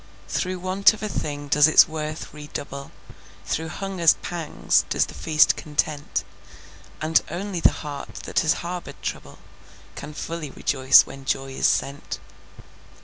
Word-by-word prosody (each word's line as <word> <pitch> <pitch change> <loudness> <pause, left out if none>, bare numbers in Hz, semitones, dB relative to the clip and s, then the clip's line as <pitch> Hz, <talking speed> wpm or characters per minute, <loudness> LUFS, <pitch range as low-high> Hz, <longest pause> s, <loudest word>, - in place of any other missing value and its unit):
Through 185 0 -2
want 185 +4 +3
of 215 - -10
a - - 0
thing 145 -7 -4
does 150 +2 +5
its 160 - +7
worth 155 0 -5
redouble, 145 -2 -7 0.6
Through 160 +1 -2
hunger's 185 -2 +2
pangs 170 -3 0
does - - +2
the - - -11
feast 155 -1 +3
content, 150 -1 -2 0.8
And 160 +1 +3
only 185 +2 -4
the - - +5
heart 145 -1 -7
that - - 0
has 160 - +2
harbored 175 0 -6
trouble, - - -5 0.6
Can 150 - -8
fully 165 -1 -5
rejoice 130 0 +5
when 135 0 -10
joy 135 0 -1
is 135 - +1
sent. 140 +1 -1
155 Hz, 145 wpm, -24 LUFS, 145-175 Hz, 0.8 s, its